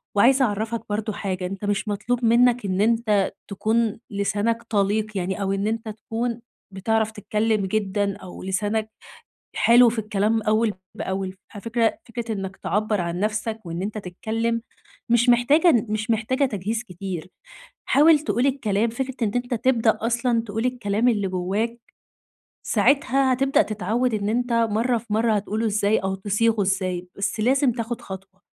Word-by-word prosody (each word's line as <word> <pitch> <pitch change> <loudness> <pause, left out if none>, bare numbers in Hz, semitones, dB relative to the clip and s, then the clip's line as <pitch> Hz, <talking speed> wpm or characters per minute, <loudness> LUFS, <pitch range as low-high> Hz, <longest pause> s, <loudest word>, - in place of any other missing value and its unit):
وعايزة 260 +6 +5
أعرفّك 220 +1 -2
برضو 215 +1 -2
حاجة، 185 -3 -3
أنت 195 +2 -5
مش 205 +1 -1
مطلوب 230 +4 -1
منّك 240 0 +4
إن 190 0 0
أنت 215 -3 +2 0.2
تكون 220 +2 0
لسانك 210 +3 -1
طليق 215 -1 0
يعني، 190 +2 -2
أو 195 -1 0
إن 195 +1 -1
أنت 225 0 -2
تكون 230 +2 -4 0.3
بتعرف 220 +3 0
تتكلّم 215 0 0
جدًا 200 0 -1
أو 185 -3 -10
لسانك 210 +3 -1 0.7
حلو 240 +1 +6
في 230 0 -2
الكلام 215 +1 0
أوّل 215 +1 +2 0.2
بأول. 190 0 -3 0.2
على 205 - -7
فكرة، 230 0 0
فكرة 230 -1 -4
إنّك 195 -2 -5
تعبر 210 -1 -1
عن 170 +1 -3
نفسك 215 +1 -1
وإن 170 +1 -4
أنت 215 +2 -3
تتكلّم 225 +5 -2 0.5
مش 240 +1 +4
محتاجة 245 +2 +4
مش 215 +2 -2
محتاجة 230 +5 +1
تجهيز 220 -1 -2
كتير. 185 -3 -6 0.6
حاول 305 +2 +6
تقول 240 -1 0
الكلام، 230 -5 +1
فكرة 265 +2 -4
إن 205 - -2
أنت 245 0 -1
تبدأ 230 -2 +2
أصلًا 235 0 +1
تقول 225 +3 -2
الكلام 235 -2 0
اللي 205 -5 +1
جوّاك، 195 +6 -2 0.9
ساعتها 275 -1 +3
هتبدأ 270 +2 +3
تتعود 220 +4 -1
إن 205 -1 -1
أنت 245 +2 0
مرّة 230 +1 +2
في 230 - -14
مرّة 225 +1 +2
هتقوله 210 +2 -1
إزاي 210 0 +2
أو 190 0 -2
تصيغه 210 +3 +1
إزاي، 185 -2 -1
بس 200 +2 -2
لازم 260 +3 +3
تأخد 230 0 -4
خطوة. 190 0 -10
220 Hz, 155 wpm, -23 LUFS, 200-235 Hz, 0.9 s, حلو